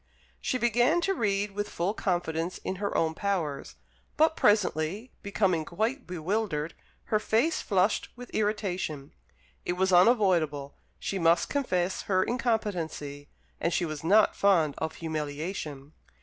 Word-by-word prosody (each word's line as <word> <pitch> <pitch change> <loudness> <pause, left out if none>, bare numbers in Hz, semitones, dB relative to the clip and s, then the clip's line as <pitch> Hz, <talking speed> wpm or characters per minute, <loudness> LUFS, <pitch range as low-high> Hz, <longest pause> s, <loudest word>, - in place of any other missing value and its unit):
She 255 - 0
began 240 +7 +3
to 390 +3 +1
read 205 - 0
with 205 +1 -3
full 180 +4 -1
confidence 175 -4 -1
in 190 - -3
her 200 +1 -1
own 160 -1 +1
powers; 165 -7 -2 0.4
but 315 +1 +4
presently, 205 - +1
becoming 195 -5 +1
quite 225 - -2
bewildered, 175 -2 -2 0.4
her 215 - +5
face 235 +10 +1
flushed 195 +1 +1
with 245 0 -10
irritation. 190 -9 -2 0.5
It - - -1
was 190 +1 +1
unavoidable: 175 - +3 0.2
she 195 - -3
must 170 0 +3
confess 185 -10 0
her 185 -1 +3
incompetency, 180 - -2 0.3
and 170 - 0
she 175 - +1
was 155 -2 -5
not 205 +6 +4
fond 170 -7 +3
of 160 0 -3
humiliation. 155 -2 -4
185 Hz, 135 wpm, -28 LUFS, 160-215 Hz, 0.5 s, her